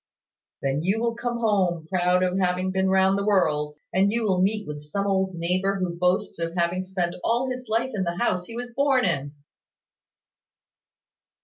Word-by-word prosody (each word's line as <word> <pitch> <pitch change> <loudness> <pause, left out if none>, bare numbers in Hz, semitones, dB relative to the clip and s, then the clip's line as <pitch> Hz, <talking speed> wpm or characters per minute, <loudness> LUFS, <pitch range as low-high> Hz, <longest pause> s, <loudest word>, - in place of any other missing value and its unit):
"Then 135 +2 0
you 190 +6 +1
will 235 0 0
come 240 0 -3
home, 190 -8 +1
proud 180 0 +2
of 185 +1 0
having 185 0 0
been 190 0 +1
round 190 +1 +3
the - - -1
world; 150 -7 +1 0.2
and 195 +2 +3
you 230 +1 0
will 190 -4 +2
meet 210 +2 +1
with 150 -1 -6
some 175 +7 -3
old 190 -2 0
neighbour 185 +3 0
who 185 -3 -2
boasts 180 +2 0
of 165 +1 -3
having 175 +1 0
spent 185 -2 -2
all 245 +3 +1
his 255 -1 -6
life 235 +4 +1
in 205 - -2
the 175 -1 -2
house 185 -6 0
he 230 - -9
was 245 0 -6
born 275 -2 +3
in." 140 +1 -1
190 Hz, 185 wpm, -25 LUFS, 175-215 Hz, 0.2 s, round